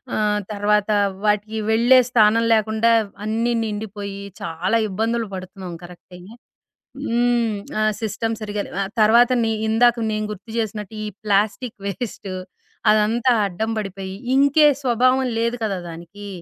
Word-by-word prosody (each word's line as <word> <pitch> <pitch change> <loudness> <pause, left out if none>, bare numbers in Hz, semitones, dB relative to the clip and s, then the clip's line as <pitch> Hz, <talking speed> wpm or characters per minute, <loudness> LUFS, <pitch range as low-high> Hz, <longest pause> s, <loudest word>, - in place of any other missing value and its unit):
ఆహ్, 210 -1 +1
తర్వాతా 210 0 +1 0.3
వాటికి 210 +1 0
వెళ్ళే 240 +3 +6
స్థానం 225 -1 +4
లేకుండా 220 +1 +2 0.2
వ్ - - -22
అన్నీ 225 +3 0
నిండిపొయ్యీ 205 -2 -5 0.2
చాలా 175 +7 -1
ఇబ్బందులు 225 +3 -1
పడుతున్నాం 185 -1 -7
కరక్టే. 180 +1 -13 0.9
హ్మ్. 235 -1 +1 0.3
ఆ - - +1 0.2
సిస్టమ్ 225 +1 -2
సరిగ్గా 205 -1 -3
లేవు. 185 - -9
ఆహ్, 195 +1 -3
తర్వాతని 235 +1 +4 0.2
ఇందాక 235 +2 +4 0.2
నేను 215 0 -2
గుర్తు 210 +2 -9
చేసినట్టు, 215 -2 -3
ఈ - - -3 0.2
ప్లాస్టిక్ 215 +4 0
వేస్ట్, 200 0 -5 0.6
అదంతా 220 +4 +2 0.2
అడ్డం 200 +4 -3
బడిపోయి, 195 -2 -5 0.2
ఇంకే 280 +3 +5 0.2
స్వభావం 255 +1 +3 0.2
లేదు 235 +1 0
కదా 200 -3 -1
దానికీ. 175 +5 -10
215 Hz, 130 wpm, -21 LUFS, 200-230 Hz, 0.9 s, వెళ్ళే